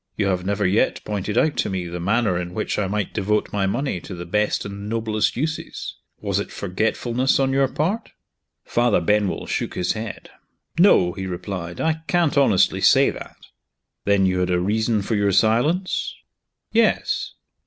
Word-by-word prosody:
You 100 - +1
have 90 -1 0
never 100 +1 -1
yet 95 +4 +2
pointed 105 +1 -3
out 155 +3 +3
to - - 0
me 95 -2 -3
the 85 +1 -5
manner 100 +2 +1
in 90 0 -4
which 105 - -2
I 100 - 0
might 100 0 -2
devote 105 +1 0
my 100 -1 +1
money 120 -1 -1
to 95 - -8
the 85 0 -7
best 105 +4 0
and 100 +1 -6
noblest 110 -1 0
uses. 155 +4 -4 0.3
Was - - 0
it - - -4
forgetfulness 120 +7 0
on 135 -1 +2
your 135 0 +3
part?" 185 - -2 0.5
Father 120 -4 +2
Benwell 105 +3 0
shook - - -3
his 90 - 0
head. 110 -1 -7 0.5
"No," 170 - +5
he 95 -1 -5
replied; 90 -1 -5
"I 160 0 0
can't 175 -4 +2
honestly 135 -10 +3
say - - +5
that." - - -10 0.7
"Then 100 -1 +3
you 90 -1 +1
had 90 0 0
a 90 0 +2
reason 110 +3 0
for 115 - -2
your 100 -1 +2
silence?" 120 - +1 0.6
"Yes." 225 -1 +1
105 Hz, 175 wpm, -22 LUFS, 95-120 Hz, 0.7 s, No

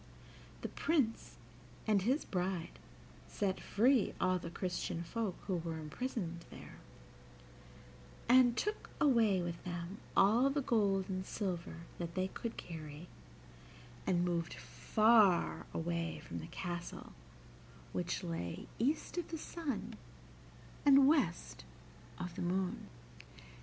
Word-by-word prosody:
The - - -2
Prince 275 -9 0 0.5
and 210 -3 +3
his 255 +10 +1
bride 180 -2 -2 0.5
set 195 -2 -1
free 240 +2 +3
all 185 0 +2
the 170 - -6
Christian 175 -1 -3
folk 210 0 -2
who 185 -3 0
were 165 -1 -3
imprisoned 170 - -4
there, - - -11 1.5
and 245 0 +6
took 420 +1 -2
away 225 - +4
with 170 -1 -5
them 175 +2 -5 0.2
all 230 +7 +6
the 280 0 0
gold 200 -6 +2
and 185 -1 -2
silver 180 -4 -4 0.2
that 170 -1 -4
they 185 0 0
could 230 +3 -5
carry, 155 0 -8 1.0
and 175 -1 +3
moved 170 -1 -1
far 215 -5 +3
away 165 -1 -2
from - - -5
the 160 - -7
castle 175 0 -5 0.8
which 180 +1 -2
lay 165 - -4
east 290 +8 0
of 350 - -4
the 330 - -4
sun 275 -9 -4 0.9
and 275 -1 +7
west 220 - +1 0.5
of 180 -1 -5
the - - -4
moon. 180 +1 -1
190 Hz, 120 wpm, -35 LUFS, 170-235 Hz, 1.5 s, and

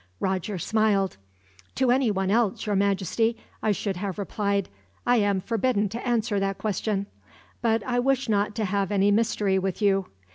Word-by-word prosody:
Roger 190 +1 -1
smiled. 200 - +1 0.6
"To 260 -2 +3
anyone 210 -7 +1
else, 220 -2 +1
your 210 -1 0
Majesty, 200 +3 +1 0.2
I 215 - +2
should 200 -2 -2
have 190 -1 -4
replied, 200 -1 -1 0.4
'I 245 - +4
am 200 -3 +2
forbidden 225 -1 0
to 235 +5 -5
answer 225 -4 +1
that 195 0 -1
question;' 205 -1 -1 0.6
but 225 -2 +1
I 245 -1 0
wish 270 +1 +1
not 205 -1 +1
to 220 - -1
have 200 0 -1
any 200 0 +3
mystery 205 -3 +2
with 190 -1 -2
you. 195 -2 +2
205 Hz, 160 wpm, -26 LUFS, 195-225 Hz, 0.6 s, I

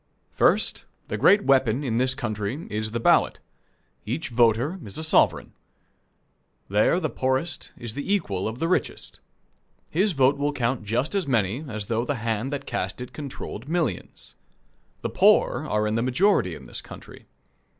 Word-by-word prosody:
First, - - +2 0.2
the - - -2
great 205 0 +5
weapon 135 -1 +3
in 115 -4 -1
this 130 +1 +2
country 120 +2 -3
is 110 +1 -2
the 115 +2 -3
ballot. - - +3 0.6
Each 130 +9 -3
voter 120 - +2
is 100 -3 -8
a 160 - -3
sovereign. 155 - +3 1.2
There 105 - +3
the 160 - -1
poorest 130 +3 -2
is 120 -3 -6
the 145 - -4
equal 105 - 0
of 110 +2 -5
the 165 - -1
richest. 180 - -2 0.7
His 190 +4 +2
vote 135 0 +3
will 145 +1 0
count 120 -3 -1
just 120 - -1
as 195 -6 0
many 115 +1 0
as 110 -4 -4
though 115 +2 -1
the 145 +3 -2
hand 115 +2 -2
that 145 - -4
cast 95 +4 -3
it 125 +1 -8
controlled 140 -1 -7
millions. 160 - -3 0.7
The - - -1
poor - - +3
are 105 0 +1
in 105 - 0
the 115 - +1
majority 130 - +2
in - - -11
this - - -6
country. - - -13
125 Hz, 165 wpm, -25 LUFS, 110-145 Hz, 1.2 s, great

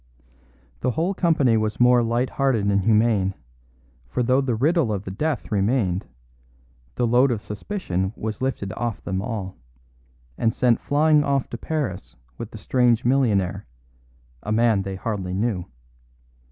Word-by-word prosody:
The 130 - 0
whole 165 - 0
company 155 - +2
was 110 -1 -2
more 125 0 +5
lighthearted 120 0 0
and 100 -1 +2
humane, 105 -2 +2 0.7
for 125 - -1
though 130 +3 +3
the 130 -4 -1
riddle 145 +1 +2
of 100 -2 -2
the 95 - -6
death 150 +5 -2
remained, 100 -2 0 0.9
the 120 - +1
load 125 +4 +4
of 120 -4 -1
suspicion 105 - -3
was 110 0 -5
lifted 120 -7 -2
off 120 -3 -4
them 95 +1 -2
all, 105 -4 -5 0.8
and 115 0 +1
sent 120 -3 +3
flying 150 +1 +3
off 140 -2 -1
to 120 - -4
Paris 135 - -4 0.2
with - - -5
the - - -10
strange 125 -3 +2
millionaire 110 - +1 0.7
a 105 - -5
man 110 -2 +3
they 95 0 -5
hardly 95 -2 -3
knew. 100 -3 -1
115 Hz, 145 wpm, -23 LUFS, 100-130 Hz, 0.9 s, more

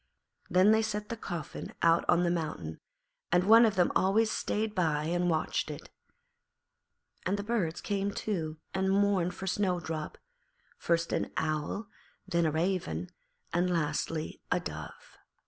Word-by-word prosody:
Then 185 +3 +5
they 220 0 +5
set 210 -1 -3
the 230 - -2
coffin 175 -8 -6
out 165 0 +5
on 175 - +5
the 170 - +2
mountain, 150 - -3 0.5
and 175 +1 +4
one 225 +4 +8
of 215 - -1
them 180 -1 +3
always 215 +4 +3
stayed 215 0 -1
by 160 -6 +1
and 175 +2 +1
watched 160 -2 0
it. - - -8 1.3
And 195 +2 0
the 200 - -3
birds 205 -7 -1
came 200 -1 -1
too 165 -8 -3 0.2
and 190 +1 +1
mourned 195 -3 +2
for 190 - -6
Snowdrop, 175 -5 -1 0.6
first 170 0 +1
an - - -1
owl, 155 +7 -1 0.4
then 170 -3 +2
a - - +1
raven, 155 - -1 0.4
and 175 +2 +2
lastly 155 -1 -1
a - - +3
dove. - - -8
180 Hz, 145 wpm, -30 LUFS, 160-200 Hz, 1.3 s, one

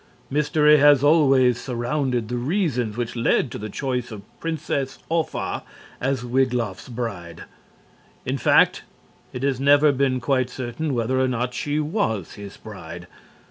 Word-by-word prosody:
Mystery 150 +1 +4
has 145 -2 +5
always 135 -5 +4
surrounded 125 -1 -2
the 120 - -3
reasons 125 - -1
which 120 -1 -3
led 120 +2 +1
to - - -6
the 105 +1 -6
choice 125 +1 -3
of 105 -2 -8 0.2
Princess 145 -4 -3
Offa 165 -1 -2 0.4
as 130 -1 -1
Wiglaf's 125 -5 -1
bride. 100 -9 -6 0.8
In - - -2
fact, - - +4 0.5
it 125 - -6
has 135 -2 0
never 145 +2 +5
been 130 -1 +1
quite 130 0 0
certain 130 +4 -4
whether 120 +3 0
or 130 - +2
not 125 0 -2
she 145 +4 -2
was 150 - -2
his 100 -1 -10
bride. - - -9
130 Hz, 140 wpm, -23 LUFS, 120-145 Hz, 0.8 s, has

